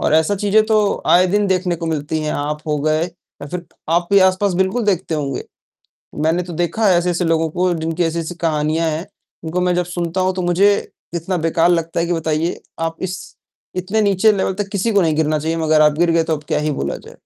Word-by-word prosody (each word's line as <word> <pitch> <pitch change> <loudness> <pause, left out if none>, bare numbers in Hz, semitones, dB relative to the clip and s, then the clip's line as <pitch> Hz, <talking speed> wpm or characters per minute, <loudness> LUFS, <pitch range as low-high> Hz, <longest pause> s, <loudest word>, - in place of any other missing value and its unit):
और - - +2
ऐसी 160 +6 +3
चीज़ें 205 +2 +3
तो 215 -2 +1
आए 180 +1 +5
दिन 205 +2 +1
देखने 185 -2 0
को 165 - -5
मिलती 155 0 -2
हैं, 150 - -2
आप 150 +1 -3
हो 150 -1 0
गए 155 +1 +1
या 170 -4 -14
फ़िर 180 +1 -5 0.3
आपके 175 +3 +3
आसपास 185 0 +3
बिल्कुल 190 +5 0
देखते 185 -4 0
होंगे। 140 -4 -3 0.8
मैंने 170 +3 +1
तो 175 -1 -8
देखा 215 +5 0
है 180 - +5
ऐसे-ऐसे 175 0 0
लोगों 165 -1 +1
को 180 +2 0
जिनकी 165 +1 -2
ऐसी-ऐसी 165 +1 -2
कहानियाँ 155 +1 +1
हैं, 160 +3 -3 0.4
उनको 170 +3 -2
मैं 180 0 +2
जब 180 0 0
सुनता 175 +1 -2
हूँ 185 0 +1
तो 185 - -2
मुझे, 185 +4 +4 0.4
इतना 175 +2 -2
बेकार 165 +1 +2
लगता 165 -1 0
है 170 - +1
कि 175 - -1
बताइए 160 +1 -1 0.2
आप 165 0 -2
इस 185 - -5 0.6
इतने 190 +4 0
नीचे 205 +1 +4
लेवल 190 -1 0
तक 200 - -1
किसी 205 +3 0
को 200 - +4
नहीं 160 -3 +1
गिरना 155 0 +1
चाहिए, 160 +2 -2
मगर 155 -1 +3
आप 150 -1 +5
गिर 170 0 +3
गए 165 0 +3
तो 160 -1 0
अब 150 - -13
क्या - - 0
ही 150 0 -1
बोला 70 - -3
जाए। - - -14
170 Hz, 225 wpm, -19 LUFS, 160-185 Hz, 0.8 s, आए